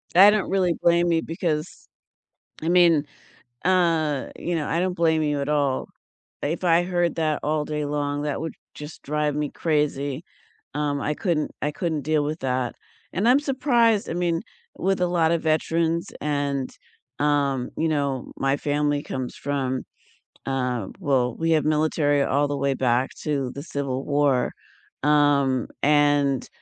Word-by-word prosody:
I 195 Hz, +3 st, +9 dB
don't 210 Hz, -2 st, +1 dB
really 185 Hz, -3 st, +2 dB
blame 170 Hz, 0 st, +3 dB
you 165 Hz, -1 st, +2 dB
because, 165 Hz, -, -3 dB, 0.7 s
I 160 Hz, -, -1 dB
mean, 170 Hz, -4 st, +5 dB, 0.6 s
uh 165 Hz, -6 st, +2 dB
you 175 Hz, -1 st, -2 dB
know, 150 Hz, -, -2 dB
I 165 Hz, -, 0 dB
don't 185 Hz, 0 st, 0 dB
blame 160 Hz, -2 st, +2 dB
you 150 Hz, -2 st, 0 dB
at 140 Hz, -, -3 dB
all. 145 Hz, -3 st, +1 dB, 0.6 s
If 165 Hz, +5 st, -2 dB
I 170 Hz, 0 st, +4 dB
heard 175 Hz, -1 st, 0 dB
that 155 Hz, -2 st, 0 dB
all 150 Hz, 0 st, 0 dB
day 150 Hz, -1 st, -3 dB
long, 145 Hz, 0 st, -2 dB
that 145 Hz, -1 st, -2 dB
would 160 Hz, -, -4 dB, 0.2 s
just 150 Hz, +1 st, -9 dB
drive 150 Hz, 0 st, -1 dB
me 150 Hz, -1 st, -1 dB
crazy, 150 Hz, -2 st, -1 dB, 0.5 s
um, 145 Hz, -1 st, -1 dB
I 150 Hz, -, 0 dB
couldn't 160 Hz, -3 st, -1 dB
I 150 Hz, -, 0 dB
couldn't 165 Hz, -7 st, -2 dB
deal 155 Hz, 0 st, +1 dB
with 155 Hz, +3 st, -3 dB
that, 130 Hz, -2 st, -1 dB, 0.4 s
and 200 Hz, +7 st, +1 dB
I'm 265 Hz, -, +6 dB
surprised, 240 Hz, -6 st, +2 dB
I -, -, -2 dB
mean, 170 Hz, -1 st, 0 dB, 0.4 s
with 190 Hz, 0 st, 0 dB
a 180 Hz, -, +3 dB
lot 170 Hz, -2 st, +2 dB
of 165 Hz, -1 st, 0 dB
veterans, 165 Hz, +1 st, +1 dB
and, 140 Hz, -2 st, -1 dB, 0.5 s
um, 140 Hz, -3 st, +1 dB
you 160 Hz, -, +1 dB
know, 140 Hz, -4 st, -1 dB
my 135 Hz, +1 st, +1 dB
family 145 Hz, 0 st, 0 dB
comes 130 Hz, -2 st, -5 dB
from, 135 Hz, -2 st, -2 dB, 0.6 s
um 125 Hz, -6 st, -2 dB
well, 130 Hz, -7 st, +1 dB
we 165 Hz, 0 st, 0 dB
have 155 Hz, -2 st, +3 dB
military 150 Hz, -2 st, +2 dB
all 145 Hz, +2 st, +1 dB
the 145 Hz, 0 st, -2 dB
way 140 Hz, 0 st, +1 dB
back 125 Hz, +1 st, +1 dB
to 140 Hz, -4 st, -1 dB
the 140 Hz, -, -6 dB
civil 140 Hz, -4 st, -3 dB
war, 145 Hz, -3 st, +2 dB, 0.5 s
um, 145 Hz, -3 st, +3 dB, 0.2 s
and, 145 Hz, -2 st, +3 dB
150 Hz, 160 wpm, -24 LUFS, 140-165 Hz, 0.7 s, I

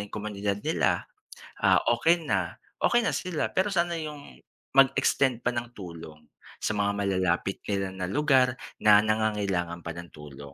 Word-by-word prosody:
'yung -, -, -11 dB
komunidad 105 Hz, -1 st, -3 dB
nila, -, -, +1 dB, 0.6 s
ah, -, -, +6 dB
okay 165 Hz, +9 st, +3 dB
na 95 Hz, -, -1 dB, 0.2 s
okay 240 Hz, -, +3 dB
na 230 Hz, -, +1 dB
sila 180 Hz, -4 st, -2 dB
pero 190 Hz, +2 st, +1 dB
sana 170 Hz, -1 st, +1 dB
'yung 150 Hz, -, -8 dB, 0.4 s
mag-extend 135 Hz, -2 st, +4 dB
pa 125 Hz, -, +1 dB
ng 120 Hz, 0 st, -4 dB
tulong 85 Hz, -5 st, -10 dB, 0.4 s
sa 110 Hz, -, -1 dB
mga 100 Hz, 0 st, +1 dB
malalapit 95 Hz, -1 st, 0 dB
nila 100 Hz, -1 st, 0 dB
na 90 Hz, -1 st, -4 dB
lugar 130 Hz, -2 st, +3 dB, 0.3 s
na 105 Hz, -1 st, +8 dB
nangangailangan 100 Hz, -6 st, 0 dB
pa 85 Hz, -, -4 dB
ng 85 Hz, 0 st, -9 dB
tulong, 70 Hz, -2 st, -11 dB
105 Hz, 155 wpm, -27 LUFS, 90-135 Hz, 0.6 s, na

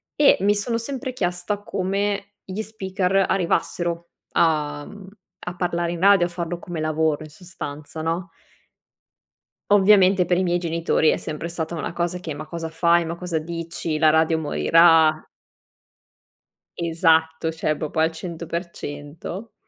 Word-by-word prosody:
e 290 Hz, -1 st, +6 dB
mi 205 Hz, +1 st, +4 dB
sono 230 Hz, +3 st, -1 dB
sempre 260 Hz, +2 st, -4 dB
chiesta 200 Hz, 0 st, -2 dB
come 200 Hz, +2 st, -2 dB
gli 195 Hz, +3 st, -5 dB
speaker 195 Hz, -3 st, 0 dB
arrivassero 170 Hz, -1 st, -1 dB, 0.2 s
a 150 Hz, -3 st, +1 dB
mhmm, 205 Hz, -2 st, -12 dB, 0.4 s
a 180 Hz, -, -4 dB
parlare 175 Hz, -1 st, -1 dB
in 170 Hz, -, -6 dB
radio, 195 Hz, -2 st, +6 dB
a 175 Hz, -, -4 dB
farlo 175 Hz, 0 st, -4 dB
come 170 Hz, -3 st, -6 dB
lavoro, 155 Hz, -1 st, 0 dB
in 155 Hz, -, -10 dB
sostanza, 155 Hz, -2 st, -8 dB
no? 170 Hz, +4 st, -2 dB, 1.4 s
Ovviamente, 195 Hz, -2 st, +6 dB
per 175 Hz, +1 st, +1 dB
i 185 Hz, -, +2 dB
miei 175 Hz, 0 st, +1 dB
genitori 165 Hz, -2 st, +1 dB
è -, -, +2 dB
sempre 155 Hz, +2 st, -5 dB
stata 170 Hz, 0 st, -4 dB
una 160 Hz, -, -4 dB
cosa 175 Hz, +1 st, -2 dB
che: 160 Hz, -4 st, -5 dB
"Ma 155 Hz, +2 st, -7 dB
cosa 165 Hz, -1 st, -5 dB
fai? 170 Hz, +1 st, +3 dB
Ma 165 Hz, +1 st, -4 dB
cosa 175 Hz, -2 st, -3 dB
dici? 165 Hz, -1 st, -4 dB
La 155 Hz, 0 st, +5 dB
radio 160 Hz, 0 st, +3 dB
morirà". 160 Hz, 0 st, +4 dB, 1.5 s
Esatto, 160 Hz, -1 st, +2 dB
cioè 155 Hz, -1 st, -1 dB
proprio 155 Hz, +1 st, -5 dB
al 160 Hz, +1 st, +3 dB
100%, 170 Hz, +2 st, -6 dB
170 Hz, 145 wpm, -23 LUFS, 160-185 Hz, 1.5 s, e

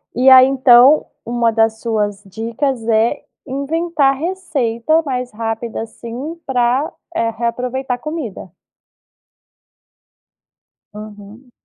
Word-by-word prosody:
E 260 Hz, +2 st, +4 dB
aí, 260 Hz, 0 st, +8 dB
então, 265 Hz, +1 st, +5 dB, 0.2 s
uma 235 Hz, -1 st, +1 dB
das 225 Hz, 0 st, +1 dB
suas 210 Hz, -3 st, -2 dB
dicas 230 Hz, +5 st, -3 dB
é 230 Hz, +5 st, +1 dB, 0.2 s
inventar 280 Hz, +1 st, 0 dB
receita 315 Hz, -5 st, -1 dB
mais 250 Hz, -4 st, -3 dB
rápida, 225 Hz, +1 st, -4 dB
assim, 240 Hz, +8 st, -7 dB
pra, 255 Hz, +2 st, 0 dB, 0.2 s
eh, 230 Hz, -7 st, 0 dB
reaproveitar 245 Hz, +3 st, -3 dB
comida? 295 Hz, -, -6 dB, 2.4 s
Aham. 210 Hz, +3 st, -12 dB
245 Hz, 95 wpm, -17 LUFS, 225-275 Hz, 2.4 s, aí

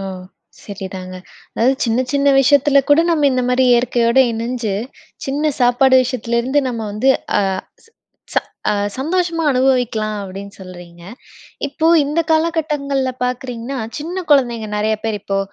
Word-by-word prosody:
ஓ! -, -, -5 dB, 0.6 s
சரிதாங்க. 190 Hz, -2 st, -7 dB, 0.4 s
"அதாவது, 255 Hz, +4 st, +2 dB
சின்ன 230 Hz, +1 st, +1 dB
சின்ன 280 Hz, 0 st, +2 dB
விஷயத்துல 280 Hz, +1 st, +4 dB
கூட 290 Hz, +3 st, +6 dB
நம்ம 300 Hz, -3 st, +2 dB
இந்த 255 Hz, -, 0 dB
மாரி 250 Hz, +1 st, +2 dB
இயற்கையோட 240 Hz, 0 st, +2 dB
இணஞ்சு, 230 Hz, -2 st, -3 dB, 0.5 s
சின்ன 290 Hz, +3 st, 0 dB
சாப்பாடு 250 Hz, +2 st, +4 dB
விஷயத்துலருந்து 250 Hz, +2 st, -1 dB
நம்ம 235 Hz, -2 st, -4 dB
வந்து 215 Hz, +6 st, 0 dB, 0.3 s
அ -, -, +3 dB, 0.4 s
ச -, -, -24 dB, 0.5 s
ச -, -, +5 dB, 0.6 s
சந்தோஷமா 330 Hz, +2 st, -1 dB
அனுபவிக்கலாம்." 245 Hz, -5 st, +1 dB
அப்படீன்னு 195 Hz, +1 st, -9 dB
சொல்றீங்க. 175 Hz, -2 st, -12 dB, 0.7 s
இப்போ 315 Hz, +3 st, -1 dB, 0.2 s
இந்த 300 Hz, +4 st, 0 dB
காலகட்டங்கள்ல 295 Hz, -5 st, 0 dB
பார்க்குறீங்கன்னா, 250 Hz, +1 st, -4 dB, 0.2 s
சின்ன 350 Hz, +4 st, -5 dB
குழந்தைங்க 240 Hz, -6 st, +2 dB
நெறைய 215 Hz, +1 st, +1 dB
பேரு 220 Hz, -2 st, -1 dB
இப்போ 195 Hz, -1 st, -2 dB
250 Hz, 130 wpm, -18 LUFS, 220-280 Hz, 0.7 s, கூட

